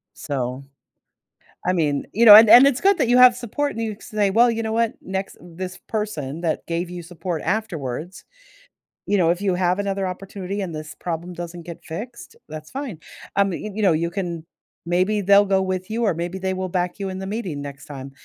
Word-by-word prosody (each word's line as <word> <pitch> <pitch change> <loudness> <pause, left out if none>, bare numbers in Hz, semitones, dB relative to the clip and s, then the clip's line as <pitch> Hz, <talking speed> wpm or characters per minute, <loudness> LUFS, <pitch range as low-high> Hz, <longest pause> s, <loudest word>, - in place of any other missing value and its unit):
So, 130 -2 -4 1.0
I 185 - +2
mean 150 -5 0
you 230 +2 +3
know, 210 -1 +12
and 220 0 +9
and 265 +3 +9
it's 275 -1 0
good 395 -1 +4
that 265 - +1
you 245 +1 +4
have 250 -1 +8
support 250 +4 -2
and 230 - -4
you 215 -2 -3
say, 210 -2 -1
"Well, 235 +3 +5
you 230 0 -3
know 220 - -2
what? 230 0 +1
Next" 190 +1 -5
this 180 +1 -7
person 170 -9 -4
that 165 -2 -2
gave 170 +1 -2
you 180 -1 -7
support 170 -1 -5
afterwards, 170 - -4 0.8
you 205 - +1
know, 170 -3 +3
if 175 +3 0
you 195 -3 +1
have 180 +1 +1
another 195 -1 -1
opportunity 195 +1 -5
and 175 -4 -4
this 155 0 -8
problem 175 +1 -4
doesn't 175 0 -7
get 170 -1 -10
fixed, 235 +9 -8
that's 155 0 -9
fine. 260 - -6 0.4
Um, 200 -2 +2
you 210 +4 -5
you 215 - -2
know, 180 -4 +5
you 170 +2 0
can 170 -4 -4 0.4
maybe 185 +4 +1
they'll 200 +1 +5
go 190 -1 +2
with 185 +1 -3
you 230 +2 -2
or 200 -5 +2
maybe 175 +3 -4
they 190 0 -1
will 185 0 -3
back 180 +2 -2
you 195 - -3
in 185 0 -6
the 190 - -5
meeting 195 -9 -4
next 140 -1 -8
time. 135 -2 -8
185 Hz, 215 wpm, -22 LUFS, 170-210 Hz, 1.0 s, know